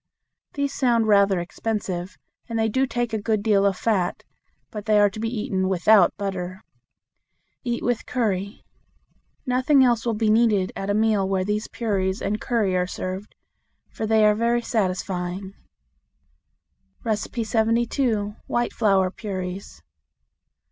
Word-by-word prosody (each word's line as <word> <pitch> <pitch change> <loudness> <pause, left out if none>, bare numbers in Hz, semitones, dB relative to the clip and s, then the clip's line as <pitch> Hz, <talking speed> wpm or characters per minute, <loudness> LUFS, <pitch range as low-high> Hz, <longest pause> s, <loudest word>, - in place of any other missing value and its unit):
These 280 -1 -1
sound 235 -4 +2
rather 200 -3 +4
expensive, 185 0 -4 0.3
and 230 - -2
they 225 0 +2
do 260 +5 +1
take 240 -2 -2
a 220 - -1
good 215 -1 0
deal 200 -2 +3
of 195 -2 -1
fat; 195 -6 0 0.5
but 210 -3 -7
they 215 -1 +4
are 205 -1 +4
to 215 - -8
be 225 +1 -1
eaten 195 -5 -1
without 190 +1 +4
butter. 190 -1 -4 1.0
Eat 240 -2 -2
with 245 -2 -1
curry. 200 -4 -2 0.8
Nothing 260 +2 +3
else 240 -3 +2
will 230 -2 -1
be 215 0 +2
needed 215 -4 +3
at 195 - -4
a 205 - +1
meal 215 -3 +2
where 190 -1 0
these 210 +2 -1
puris 195 -4 -1
and 210 +2 -2
curry 215 -6 0
are 180 0 +1
served, 185 +3 -6 0.6
for 220 - -4
they 220 0 +4
are 210 - +5
very 235 +2 +1
satisfying. 185 -3 -2 1.5
72. 225 0 0
White 240 0 -1
Flour 195 -4 +2
Puris. 185 - -6
210 Hz, 140 wpm, -24 LUFS, 190-230 Hz, 1.5 s, are